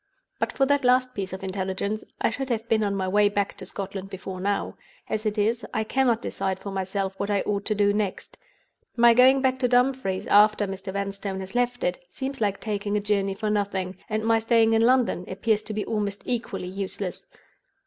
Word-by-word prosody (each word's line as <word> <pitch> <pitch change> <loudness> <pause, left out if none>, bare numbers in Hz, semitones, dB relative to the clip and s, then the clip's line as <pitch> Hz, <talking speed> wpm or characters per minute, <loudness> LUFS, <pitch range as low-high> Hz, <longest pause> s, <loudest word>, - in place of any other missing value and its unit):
But - - 0
for 270 - +2
that 285 0 +2
last 255 0 +3
piece 195 -2 -4
of 190 +1 -7
intelligence, 190 +2 -2 0.2
I - - +2
should 265 +3 -4
have 230 -1 -2
been 220 -1 +2
on 200 -1 0
my 190 -1 -1
way 205 +2 +4
back 200 -1 -1
to - - -7
Scotland 195 -1 -5
before 190 -1 -7
now. 200 +1 -1 0.3
As 215 0 -2
it 210 +1 -2
is, 225 +3 +1
I 220 - +1
cannot 240 0 +1
decide 190 -1 -2
for 200 - -7
myself 195 0 -2
what 200 - -2
I 200 -2 +2
ought 200 -1 -2
to 215 - 0
do 205 0 +3
next. 205 -2 -3 0.6
My 235 0 +7
going 260 +3 +6
back 260 0 +2
to 250 - +2
Dumfries, 245 -6 +1
after 210 0 +5
Mr. 195 0 -5
Vanstone 200 0 -3
has 190 +1 -8
left 245 0 0
it, 180 0 0
seems 265 +5 -5
like 200 -2 0
taking 205 -1 -2
a - - +2
journey 200 -1 0
for 210 +2 -2
nothing 195 -3 -1
—and 215 0 -1
my 225 0 +3
staying 225 0 +3
in 225 - +4
London 245 -5 +3
appears 210 +3 0
to 215 - -6
be 210 - -2
almost 205 -2 -2
equally 235 -6 -3
useless. 190 0 -5
205 Hz, 210 wpm, -25 LUFS, 195-230 Hz, 0.6 s, My